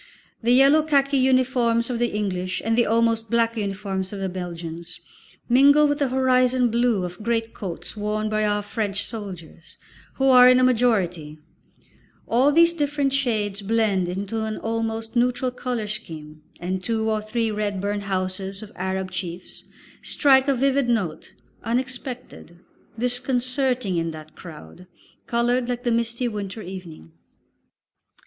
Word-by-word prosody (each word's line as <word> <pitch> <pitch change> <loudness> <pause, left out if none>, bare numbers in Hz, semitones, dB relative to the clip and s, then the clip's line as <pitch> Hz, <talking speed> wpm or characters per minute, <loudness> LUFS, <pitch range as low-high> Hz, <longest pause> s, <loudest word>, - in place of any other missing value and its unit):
The 235 +1 +2
yellow 275 +5 +6
khaki 280 -2 +2
uniforms 255 -2 +2
of 235 - -2
the 240 - +2
English 185 -4 -2
and 225 0 +2
the 240 0 +3
almost 225 0 +1
black 230 0 +1
uniform 200 -2 -3
of 190 - -5
the 195 -1 -2
Belgians 170 -1 -7 0.5
mingle 280 +4 +6
with 290 0 -1
the 280 - +2
"horizon" 255 -1 +2
blue 235 -4 +1
of 180 +2 -6
great 225 0 -1
coats 180 -5 -6
worn 210 +1 -2
by 215 0 0
our 205 0 0
French 205 -1 -2
soldiers, 185 -7 -9 0.4
who 270 - +1
are 250 -1 +8
in 255 0 +6
a - - +3
majority; 195 -11 +1 0.9
all 255 +5 +3
these 335 +2 +5
different 290 -3 0
shades 215 -7 -1
blend 200 -4 +1
into 200 +4 -3
an 220 -1 -3
almost 225 0 -3
neutral 250 +1 +1
colour 245 -3 -3
scheme, 155 -8 -6 0.2
and 185 +1 -3
two 220 0 -1
or 215 -1 0
three 225 +1 -1
red 205 -2 -2
burnouses 195 0 -3
of 210 - -11
Arab 190 0 -3
chiefs 180 -1 -7 0.4
strike 265 -1 +3
a 275 - +3
vivid 270 0 +1
note, 185 -10 -2 0.3
unexpected, 250 - -4 0.4
disconcerting, 250 -3 -1
in 165 0 -1
that 155 -1 -10
crowd, 165 - -12 0.4
coloured 240 +1 +1
like 245 0 -3
the 240 - +1
misty 235 +1 0
winter 210 -1 -5
evening. 175 - -9
225 Hz, 145 wpm, -23 LUFS, 190-250 Hz, 0.9 s, are